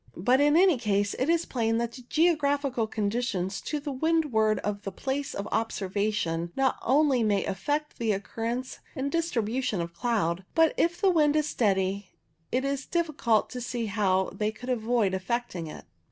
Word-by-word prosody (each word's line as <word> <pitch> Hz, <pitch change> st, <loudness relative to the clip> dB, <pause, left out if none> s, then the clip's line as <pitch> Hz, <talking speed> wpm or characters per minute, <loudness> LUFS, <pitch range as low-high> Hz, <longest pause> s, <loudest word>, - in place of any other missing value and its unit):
But 250 Hz, +10 st, +3 dB
in 295 Hz, +2 st, +5 dB
any 360 Hz, -7 st, +5 dB
case 205 Hz, -3 st, +1 dB
it 260 Hz, +5 st, +1 dB
is 335 Hz, 0 st, +2 dB
plain 225 Hz, -3 st, 0 dB
that 235 Hz, 0 st, -1 dB
the 255 Hz, -, -10 dB
geographical 285 Hz, -4 st, +1 dB
con 210 Hz, -2 st, -1 dB
ditions 200 Hz, -6 st, -2 dB
to 300 Hz, -, -2 dB
the 290 Hz, 0 st, -5 dB
windward 265 Hz, -8 st, +2 dB
of 205 Hz, -1 st, -3 dB
the 195 Hz, -, -5 dB
place 270 Hz, +7 st, -3 dB
of 200 Hz, -, -4 dB
observation 195 Hz, -5 st, -1 dB
not 270 Hz, -1 st, +1 dB
only 275 Hz, -1 st, +3 dB
may 205 Hz, -3 st, +1 dB
affect 290 Hz, +10 st, -2 dB
the 230 Hz, -2 st, +1 dB
occurrence 230 Hz, +5 st, -3 dB, 0.2 s
and 280 Hz, 0 st, -2 dB
distribution 250 Hz, -, -1 dB
of 170 Hz, 0 st, -4 dB
cloud, 190 Hz, -5 st, 0 dB
but 325 Hz, -1 st, +4 dB
if 345 Hz, +1 st, +1 dB
the 390 Hz, -, +4 dB
wind 300 Hz, -3 st, +3 dB
is 305 Hz, -1 st, +2 dB
steady 195 Hz, -2 st, 0 dB, 0.4 s
it 260 Hz, +2 st, 0 dB
is 275 Hz, -1 st, -2 dB
difficult 305 Hz, -, +1 dB
to 250 Hz, -, -5 dB
see 240 Hz, -1 st, -3 dB
how 195 Hz, -3 st, +1 dB
they 210 Hz, 0 st, -1 dB
could 245 Hz, +3 st, -9 dB
avoid 230 Hz, -4 st, +1 dB
affecting 190 Hz, -3 st, -2 dB
it. 155 Hz, -, -9 dB
235 Hz, 175 wpm, -27 LUFS, 205-280 Hz, 0.4 s, in